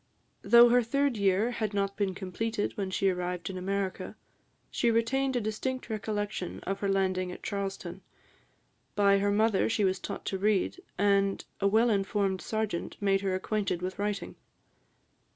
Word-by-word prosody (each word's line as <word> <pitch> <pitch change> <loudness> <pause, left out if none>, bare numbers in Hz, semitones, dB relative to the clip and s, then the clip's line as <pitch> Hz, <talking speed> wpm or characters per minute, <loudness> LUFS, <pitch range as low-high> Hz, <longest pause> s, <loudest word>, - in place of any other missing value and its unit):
Though 235 0 +7
her 245 +1 +5
third 275 +3 +1
year 200 +3 +2
had 215 -4 -3
not 200 0 0
been 195 -3 -1
completed 205 +4 -3
when 195 -2 -3
she 195 +1 0
arrived 180 0 -3
in 185 - -6
America, 195 0 -3 0.6
she 235 - +1
retained 255 +4 +1
a - - +2
distinct 225 +4 -3
recollection 205 -3 -3
of 195 +1 -3
her 200 - -1
landing 185 -2 0
at - - -10
Charlestown. 195 -2 -4 0.9
By 200 -1 +4
her 200 +1 +1
mother 215 0 +2
she 220 -2 +1
was 190 0 +1
taught - - -6
to 190 - -2
read, 210 - +1 0.2
and 200 0 +2
a 200 - +2
well 225 +4 +4
informed 195 -1 0
serjeant 215 -5 -3
made 195 -1 +2
her 190 -2 0
acquainted 190 -2 -2
with 185 +2 -4
writing. 205 -1 -3
200 Hz, 160 wpm, -29 LUFS, 190-220 Hz, 0.9 s, Though